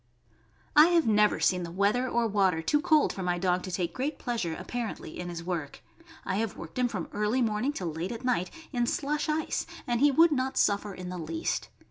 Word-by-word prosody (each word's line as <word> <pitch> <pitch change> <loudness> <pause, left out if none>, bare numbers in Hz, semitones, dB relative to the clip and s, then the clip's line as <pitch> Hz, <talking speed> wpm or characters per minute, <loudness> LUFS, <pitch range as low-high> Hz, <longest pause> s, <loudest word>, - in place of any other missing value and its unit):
I 300 +2 +9
have 345 -2 +3
never 210 -1 +3
seen 180 -1 +2
the 170 - -5
weather 205 +8 +1
or 235 -1 +1
water 190 -6 +2
too 295 - +2
cold 310 -3 +3
for 190 - -6
my 180 -1 0
dog 180 0 +1
to 185 - -6
take 175 -1 -2
great 280 +4 -2
pleasure, 225 -10 -2
apparently, 235 -9 -5
in 175 0 -4
his 170 -1 -6
work. 170 -5 -4 0.4
I 190 - -1
have 220 -2 -2
worked 170 +9 -7
him 250 - +3
from 200 -8 -4
early 210 +5 +1
morning 220 +4 0
till 180 - -4
late 165 +4 -4
at 235 +1 -6
night, 235 -8 +1 0.2
in 240 -1 +1
slush 295 +4 -1
ice, 310 +1 -1 0.2
and 240 -3 0
he 290 +3 +6
would 325 +4 +5
not 265 -2 -1
suffer 205 -1 +1
in 180 -1 -7
the 180 0 -5
least. 160 0 -3
210 Hz, 215 wpm, -28 LUFS, 180-255 Hz, 0.4 s, I